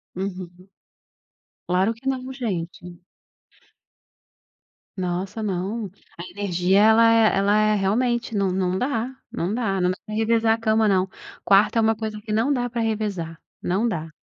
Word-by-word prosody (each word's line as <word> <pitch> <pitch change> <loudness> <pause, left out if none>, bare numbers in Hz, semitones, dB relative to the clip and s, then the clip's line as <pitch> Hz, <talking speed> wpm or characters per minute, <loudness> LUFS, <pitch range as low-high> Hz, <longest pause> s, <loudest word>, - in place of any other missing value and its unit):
Uhum. 185 -1 -6 1.0
Claro 185 +5 +2
que 240 +4 -6
não 260 0 -3
gente. 180 -7 -5 2.0
Nossa 185 +4 -3
não, 200 +3 -3 0.3
a 175 - -6
energia 185 0 +1
ela 225 +2 +6
é 225 -3 +4
ela 200 +1 +3
é 215 0 +3
realmente 230 +4 0
não 195 -2 +1
não 185 0 0
dá 250 +2 -2 0.2
não 180 +5 -2
dá 210 -5 -1
não 180 0 +2
dá - - -7
pra 215 - -9
revezar 225 0 +2
a - - -4
cama 220 -1 +2
não, 190 -1 +2 0.4
quarto 200 +3 +4
é - - +5
uma 225 0 +3
coisa 215 -1 -5
que 215 0 -6
não 225 +7 +2
dá 245 -2 0
pra 240 0 -4
revezar, 205 -7 -3 0.2
não 200 +7 0
dá. 160 -5 -4
210 Hz, 155 wpm, -23 LUFS, 185-225 Hz, 2.0 s, ela